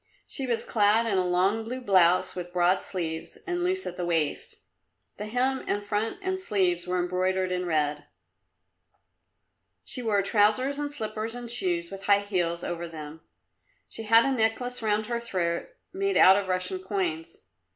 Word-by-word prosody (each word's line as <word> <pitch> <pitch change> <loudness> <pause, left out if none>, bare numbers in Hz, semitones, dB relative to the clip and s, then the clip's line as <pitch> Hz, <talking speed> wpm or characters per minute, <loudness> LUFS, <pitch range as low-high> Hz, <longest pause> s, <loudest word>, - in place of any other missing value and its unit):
She 270 -3 -2
was 235 -2 -1
clad 215 +1 +3
in 200 -4 +1
a - - +2
long 190 +5 +2
blue 250 +3 -5
blouse 185 -6 +3
with 175 -1 -6
broad 180 +1 +2
sleeves, 165 -4 -5
and 350 -1 -2
loose 375 +1 0
at 180 - -6
the 180 - -3
waist 165 -4 -1 0.6
the 210 - -5
hem 255 +4 0
and 205 0 -1
front 210 +2 -1
and 375 0 -1
sleeves 185 - 0
were 180 0 0
embroidered 185 +1 0
in 180 0 -2
red. 150 -2 0 1.8
She 250 - -4
wore 210 -4 +1
trousers 215 +8 +2
and 290 0 -3
slippers 220 -3 -4
and 240 -1 -5
shoes 175 -7 0
with 195 0 -8
high 200 0 +4
heels 175 -4 -1
over 170 0 -4
them; 155 -1 -9 0.7
she - - -5
had 225 +1 +5
a 275 - +1
necklace 245 +1 0
round 215 -1 +1
her 235 +1 -2
throat 180 -7 -2 0.3
made 395 +1 0
out 190 - +8
of 200 -1 -1
Russian 185 0 -2
coins. 175 - -4
200 Hz, 170 wpm, -27 LUFS, 180-230 Hz, 1.8 s, out